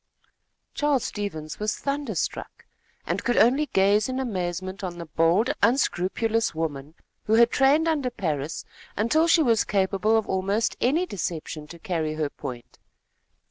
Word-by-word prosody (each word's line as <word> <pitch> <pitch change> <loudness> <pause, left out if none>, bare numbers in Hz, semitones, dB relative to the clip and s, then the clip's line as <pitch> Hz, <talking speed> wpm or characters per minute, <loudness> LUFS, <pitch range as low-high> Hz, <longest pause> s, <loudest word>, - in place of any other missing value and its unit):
Charles 290 -4 +1
Stevens 160 -7 -5
was 210 0 -1
thunderstruck, 275 - -3 0.4
and - - -2
could 240 - +1
only 270 +7 +4
gaze 205 +1 +3
in 260 0 -2
amazement 185 -5 -3
on 175 -2 -4
the 170 - -6
bold, 165 - +2
unscrupulous 225 - +1
woman, 155 -2 -4 0.3
who 215 - +1
had 235 +2 +6
trained 290 +5 +3
under 295 -6 +1
Parris, 160 - -3 0.3
until 310 +10 +3
she 330 -1 +5
was 230 -5 +3
capable 200 +2 +1
of 220 - -1
almost 195 +4 0
any 310 +9 +2
deception 165 - -5
to 170 - -11
carry 160 -3 -2
her 155 -2 -2
point. 125 -4 -9
205 Hz, 140 wpm, -25 LUFS, 170-245 Hz, 0.4 s, had